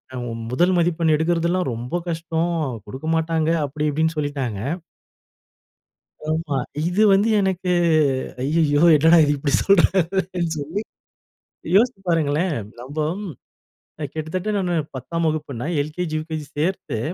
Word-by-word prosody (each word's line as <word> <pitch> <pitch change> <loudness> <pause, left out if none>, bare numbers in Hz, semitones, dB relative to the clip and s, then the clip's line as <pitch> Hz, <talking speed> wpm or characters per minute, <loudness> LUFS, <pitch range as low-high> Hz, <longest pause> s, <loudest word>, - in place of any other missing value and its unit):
அ - - -4 0.3
முதல் 175 +8 +3
மதிப்பெண் 170 -2 +2
எடுக்கிறதெல்லாம் 170 +1 +1
ரொம்ப 120 +7 -5
கஷ்டம். 165 0 -1 0.4
குடுக்கமாட்டாங்க" 160 +5 -1 0.2
அப்பிடி 150 +2 -2
இப்பிடின்னு 160 +2 0
சொல்லிட்டாங்க. 140 -8 -2 1.7
ஆமா. 155 -3 -1 0.3
இது 180 +4 +1
வந்து 200 +3 +3
எனக்கு, 185 -1 0 0.7
ஐயய்யோ! 145 0 +2
என்னடா 160 +3 +6
இது 145 - +2
இப்பிடி 140 0 -1
சொல்றாங்களேன்னு 185 -2 +2
சொல்லி. 155 +8 -3 1.0
யோசித்து 230 -1 +3
பாருங்களேன்! 160 +1 +1 0.2
நம்ப 155 +9 -3 0.8
அ - - -2
கிட்டத்தட்ட 160 +6 -3
நானு 180 -3 0 0.2
10ஆம் 165 +6 -3
வகுப்புன்னா, 150 -5 -3
எல்கேஜி, 155 +2 -3
யுகேஜி 155 -1 -5
சேர்த்து 160 - -1
160 Hz, 110 wpm, -22 LUFS, 150-175 Hz, 1.7 s, என்னடா